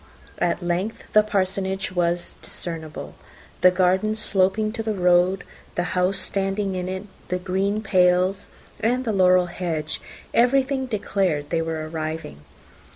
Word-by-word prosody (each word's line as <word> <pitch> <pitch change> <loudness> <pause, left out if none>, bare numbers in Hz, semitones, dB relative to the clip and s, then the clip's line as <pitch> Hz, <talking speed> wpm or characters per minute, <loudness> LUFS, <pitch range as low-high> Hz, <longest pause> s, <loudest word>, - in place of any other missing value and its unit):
At - - 0
length 180 +6 -2
the 215 - +8
Parsonage 195 -1 -1
was 175 -1 0
discernible. 160 -3 -6 0.5
The 180 - +8
garden 185 +4 +2
sloping 210 0 +1
to 225 0 -4
the 220 -1 -2
road, 180 +1 +3 0.3
the 175 - +1
house 185 +2 +2
standing 195 +1 0
in 185 0 -3
it, 190 +1 -4 0.2
the 180 - -1
green 195 +3 -1
pales 185 0 +3 0.3
and 250 +3 +1
the 220 - 0
laurel 185 -2 +5
hedge, 170 -3 -3 0.3
everything 265 +2 +3
declared 195 -9 -1
they 165 -1 +1
were 160 -1 -3
arriving. 155 - -5
185 Hz, 135 wpm, -23 LUFS, 175-205 Hz, 0.5 s, the